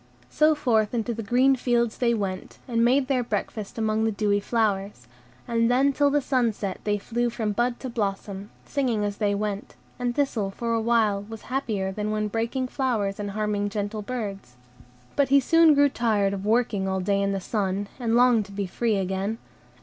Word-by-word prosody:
So 310 0 +4
forth 230 -6 +1
into 235 0 -1
the 225 - -5
green 250 +5 +3
fields 240 -3 0
they 235 -2 +2
went, 190 -3 -4
and 230 -2 +1
made 260 +3 +3
their 260 -2 +1
breakfast 210 -1 -4
among 220 0 0
the 225 - +2
dewy 205 -1 +1
flowers; 200 - -1 0.4
and 230 -1 +2
then 270 +3 +3
till 285 +1 +3
the 290 +1 +2
sun 250 -4 +1
set 200 -2 -4
they 205 -1 +1
flew 240 +4 -1
from 225 -2 -2
bud 240 +3 0
to 265 - -4
blossom, 200 -3 -3 0.2
singing 245 -7 0
as 205 -1 -3
they 205 -2 +1
went; 205 0 -4 0.2
and 245 -1 -1
Thistle 245 -9 0
for 230 +4 -3
a 225 - +1
while 220 -3 +2
was 225 -1 -8
happier 210 -8 -1
than 210 +2 -3
when 215 0 -1
breaking 230 +4 -1
flowers 225 -8 -1
and 205 -1 -3
harming 205 0 -1
gentle 210 +1 -3
birds. 200 - -5 0.6
But 280 -2 +2
he 280 +1 +6
soon 330 +2 +5
grew 285 0 +5
tired 215 -6 +1
of 200 +1 -4
working 220 -4 +1
all 190 0 -1
day 200 +1 +1
in 200 0 +1
the 195 - -1
sun, 200 0 -2
and 230 -2 0
longed 240 -3 +4
to 200 - -13
be 200 0 -3
free 220 +4 0
again. 195 +3 -2
220 Hz, 195 wpm, -25 LUFS, 200-245 Hz, 0.6 s, he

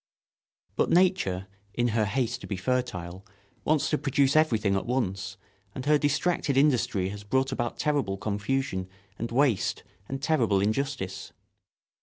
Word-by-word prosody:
But - - +2
nature, 170 - +2 0.3
in 120 0 +2
her 110 -1 +1
haste 120 +3 -1
to - - -8
be 100 - -3
fertile, 95 -5 -2 0.4
wants 155 -1 +2
to 150 - +1
produce 140 0 +2
everything 115 -10 +3
at 95 - -2
once, 95 -7 -2 0.4
and 130 - -5
her 150 0 +4
distracted 145 -1 +1
industry 125 -9 +2
has 105 +1 -7
brought 130 +6 +1
about 120 -3 -2
terrible 140 -10 0
confusion 105 -1 -2 0.3
and 115 +1 -3
waste 125 -5 +1 0.3
and 135 - -3
terrible 125 -10 +2
injustice. 105 -3 -2
120 Hz, 140 wpm, -27 LUFS, 100-140 Hz, 0.4 s, her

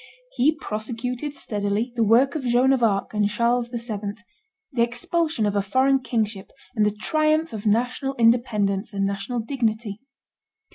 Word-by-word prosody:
He 310 - +2
prosecuted 245 +4 -4
steadily 210 0 -2
the 230 - +2
work 240 +6 +4
of 310 -4 -3
Joan 250 +2 +3
of 260 - 0
Arc 205 -3 +1
and 210 -1 +2
Charles 235 +3 +1
VII., 225 -4 -4 0.6
the 245 -4 0
expulsion 245 +3 0
of 205 0 0
a 200 - +3
foreign 260 +7 +2
kingship 215 -6 -2 0.3
and 215 - +2
the 210 - +3
triumph 310 +4 +1
of 215 0 -4
national 250 +5 0
independence 220 -4 +2
and 195 0 0
national 200 +5 -2
dignity. 220 -4 -2
235 Hz, 150 wpm, -24 LUFS, 210-260 Hz, 0.6 s, work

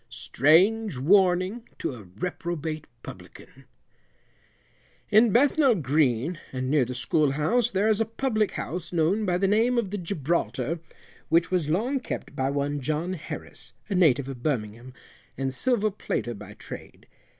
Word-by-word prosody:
STRANGE 165 - +3
WARNING 185 - +2
TO - - -3
A 120 - -10 0.2
REPROBATE 165 -3 -4 0.2
PUBLICAN. - - -12 1.5
In 220 +3 +6
Bethnal 270 +2 +4
Green, 150 - +1
and 130 0 -3
near 145 -4 +3
the 125 - -6
school 145 +3 +1
house, 210 - +1
there 195 +2 +1
is 220 0 +2
a - - +2
public 220 -2 -1
house 170 0 -5
known 180 +6 +1
by 180 -1 +2
the 195 +2 +1
name 230 +5 +2
of 215 -5 0
the 205 - -3
Gibraltar, 165 -3 -2 0.5
which 165 +2 +3
was 175 -5 0
long 235 - 0
kept 195 - -6
by 130 0 0
one 145 +1 -1
John 155 +7 -2
Harris, 170 -3 -8 0.2
a - - -1
native 145 -8 +3
of 130 -3 -7
Birmingham, 120 -3 -3 0.5
and 135 -1 -2
silver 215 - +1
plater 120 -10 -3
by 105 -1 -11
trade. - - -10
170 Hz, 150 wpm, -26 LUFS, 135-205 Hz, 1.5 s, In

